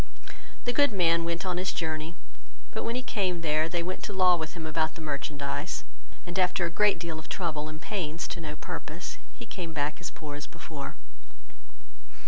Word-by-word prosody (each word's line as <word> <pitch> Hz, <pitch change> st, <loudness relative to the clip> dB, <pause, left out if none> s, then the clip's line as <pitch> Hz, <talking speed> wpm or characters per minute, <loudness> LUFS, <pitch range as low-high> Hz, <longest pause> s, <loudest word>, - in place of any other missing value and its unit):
The 245 Hz, -, +3 dB
good 285 Hz, -1 st, +6 dB
man 170 Hz, -4 st, +4 dB
went 170 Hz, +2 st, 0 dB
on 180 Hz, -1 st, +1 dB
his 185 Hz, +1 st, +1 dB
journey; 160 Hz, 0 st, -1 dB, 0.6 s
but -, -, -2 dB
when 230 Hz, -, 0 dB
he 255 Hz, -, 0 dB
came 185 Hz, -8 st, +1 dB
there, 155 Hz, 0 st, +3 dB
they 170 Hz, 0 st, +1 dB
went 185 Hz, +2 st, -2 dB
to 205 Hz, -, -4 dB
law 185 Hz, -2 st, +7 dB
with 160 Hz, -1 st, -3 dB
him 165 Hz, -2 st, -4 dB
about 160 Hz, 0 st, +1 dB
the -, -, -8 dB
merchandize, 145 Hz, 0 st, -1 dB, 0.4 s
and 175 Hz, +1 st, -2 dB
after 185 Hz, 0 st, +4 dB
a 170 Hz, -, -1 dB
great 210 Hz, +2 st, +5 dB
deal 165 Hz, -2 st, -3 dB
of 155 Hz, -, -10 dB
trouble 155 Hz, -4 st, 0 dB
and 155 Hz, 0 st, -6 dB
pains 170 Hz, -4 st, -1 dB
to 170 Hz, -, -3 dB
no 155 Hz, -1 st, -3 dB
purpose, -, -, -5 dB, 0.2 s
he -, -, -7 dB
came 170 Hz, -4 st, -4 dB
back 150 Hz, +2 st, 0 dB
as 175 Hz, -, -1 dB
poor 150 Hz, -2 st, -6 dB
as 145 Hz, 0 st, -5 dB
before. 140 Hz, -4 st, -6 dB
165 Hz, 195 wpm, -30 LUFS, 155-185 Hz, 0.6 s, law